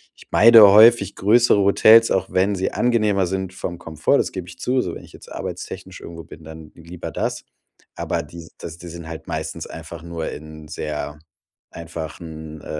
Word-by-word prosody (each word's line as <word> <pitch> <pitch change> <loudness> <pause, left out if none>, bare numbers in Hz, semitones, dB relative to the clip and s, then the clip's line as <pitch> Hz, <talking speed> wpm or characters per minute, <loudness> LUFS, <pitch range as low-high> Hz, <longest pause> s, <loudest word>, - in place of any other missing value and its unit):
ich - - -18
meide 115 0 +8
häufig 110 -1 +6
größere 115 +1 +3
Hotels, 110 +3 +5
auch 95 - -1
wenn 100 +2 +1
sie 95 - -2
angenehmer 105 -6 +1
sind 95 0 -4
vom 85 -1 -6
Komfort, 80 - 0
das - - -1
gebe 95 -2 -7
ich 85 -1 -12
zu, 125 0 0
so - - -5
wenn - - -10
ich - - -17
jetzt - - -15
arbeitstechnisch - - -8
irgendwo 85 -1 -10
bin, 80 - -14
dann 80 0 -12
lieber 85 +1 -9
das. - - -4 0.5
Aber, 85 -2 -3
die 80 +2 -12
das 85 -1 -9
die 90 - -10
sind 85 -1 -9
halt 80 -1 -9
meistens 80 +1 -5
einfach 80 0 -10
nur 85 -1 -6
in 80 0 -11
sehr 75 -1 -6 0.5
einfachen, 80 -1 -9
äh, - - -16
85 Hz, 185 wpm, -21 LUFS, 80-100 Hz, 0.5 s, meide